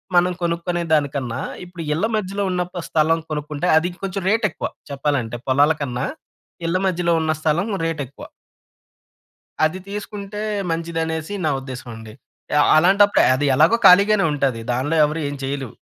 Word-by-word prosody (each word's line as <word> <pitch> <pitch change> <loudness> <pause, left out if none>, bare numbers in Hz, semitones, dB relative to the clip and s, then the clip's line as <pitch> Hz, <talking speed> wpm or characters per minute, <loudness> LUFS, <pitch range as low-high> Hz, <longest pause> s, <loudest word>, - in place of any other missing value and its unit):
మనం 180 +1 +4
కొనుక్కునే 170 +1 -1
దానికన్నా, 140 -5 0 0.3
ఇప్పుడు 175 -2 -8
ఇళ్ల 165 +8 0
మధ్యలో 200 -1 -2
ఉన్న 180 -1 -1
ఒక్క 180 0 -7
స్థలం 160 +1 +2
కొనుక్కుంటే 150 +2 -3
అది 165 +3 +1
కొంచెం 195 0 -3
రేట్ 220 +1 +2
ఎక్కువ. - - -4 0.2
చెప్పాలంటే 135 -4 -2
పొలాల 145 +4 +4
కన్నా, 125 -1 -2 0.6
ఇళ్ల 170 +2 +1
మధ్యలో 175 -1 +1
ఉన్న 160 0 0
స్థలం 160 +6 +1 0.2
రేట్ 165 -2 -2
ఎక్కువ. 140 - -12 1.4
అది 155 +4 -2
తీసుకుంటే 205 0 -6 0.3
మంచిదనేసి 165 +1 -3
నా - - +2
ఉద్దేశం 130 -2 -8
అండి. 110 -1 -11 0.5
ఆహ్, 145 - +4
అలాంటప్పుడే 200 +5 +5
అది 145 +3 -1
ఎలాగో 160 - +5
ఖాళీగానే 200 +2 +6
ఉంటది. 135 -5 -1
దానిలో 130 +6 -1
ఎవరు 155 +2 -3
ఏం 145 - -5
చేయలేం. 135 -3 -4
160 Hz, 145 wpm, -21 LUFS, 145-180 Hz, 1.4 s, ఖాళీగానే